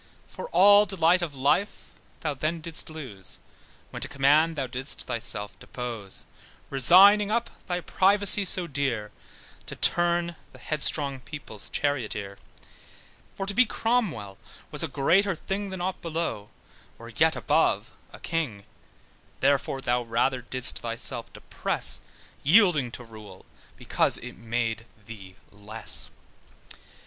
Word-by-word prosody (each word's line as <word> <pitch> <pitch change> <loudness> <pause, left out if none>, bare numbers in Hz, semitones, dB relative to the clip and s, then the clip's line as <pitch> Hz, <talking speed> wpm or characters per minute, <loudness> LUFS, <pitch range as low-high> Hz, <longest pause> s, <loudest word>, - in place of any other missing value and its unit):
For - - -8
all 205 - +6
delight 180 -1 +3
of 160 -5 -4
life 145 +10 0 0.3
thou 155 -3 -1
then 155 +4 -2
didst 160 0 -1
lose, 130 - -7 0.5
When - - -7
to - - -2
command, 150 +4 +3
thou 140 -3 -2
didst 130 +2 -3
thyself 110 -4 -3
dispose; 115 -6 -6 0.5
Resigning 195 +10 +7
up 235 +2 -1 0.2
thy 180 -1 -2
privacy 200 +3 +4
so 180 -1 +1
dear, 130 -9 -2 0.6
To - - -7
turn 175 -1 +1 0.2
the - - -13
headstrong 140 -2 0
people's 130 -7 -7
charioteer; 105 -8 -2 1.0
For 195 - -4
to 200 - -3
be 240 +3 +4
Cromwell 195 - -1 0.3
was - - -1
a - - 0
greater 185 +7 +2
thing, 195 +4 -4
Then 190 -2 -6
ought 185 +1 -3
below, 160 -11 -4 0.5
or - - -11
yet - - +2
above - - +1 0.2
a - - -12
king: 145 -12 -3 0.8
Therefore 140 -1 +1
thou 125 -1 0
rather 120 +2 0
didst 130 +1 0
thyself 115 0 -4
depress, - - -1 0.4
Yielding 160 - +4
to 125 - -7
rule, 110 -5 -13 0.3
because - - +1
it - - -8
made 115 0 -3 0.2
thee 100 -4 -11 0.2
less. 105 +2 -7
140 Hz, 130 wpm, -26 LUFS, 115-180 Hz, 1.0 s, Resigning